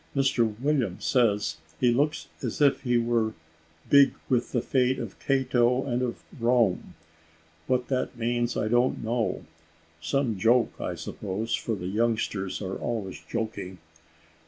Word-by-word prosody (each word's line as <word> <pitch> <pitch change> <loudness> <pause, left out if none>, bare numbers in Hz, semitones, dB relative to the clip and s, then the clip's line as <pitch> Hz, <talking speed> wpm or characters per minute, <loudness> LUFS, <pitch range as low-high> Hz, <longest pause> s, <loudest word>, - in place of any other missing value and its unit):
Mr 120 -6 +1
William 130 -9 0
says, 110 -5 +1 0.2
he 125 -1 +4
looks 150 +5 0
as - - -3
if 145 -2 +4
he 125 -2 +2
were 115 -2 +1 0.5
`big 140 -1 +6 0.2
with 125 -2 +1
the 120 - +1
fate 130 +1 +1
of - - -6
Cato 130 -2 +2
and 125 -2 -1
of 125 -2 -3 0.2
Rome:' 115 -5 +1 0.7
what 125 -1 +1
that 130 -2 -1
means 120 +1 0
I - - 0
don't 120 +3 +2
know 115 0 -1 0.6
some 115 - 0
joke, 115 +3 +3
I - - -3
suppose, 105 +3 -4
for 115 - -1
the 90 - -7
youngsters 105 -1 -1
are 95 0 -3
always 110 -6 -4
joking. 110 -5 -4
120 Hz, 140 wpm, -27 LUFS, 110-130 Hz, 0.7 s, `big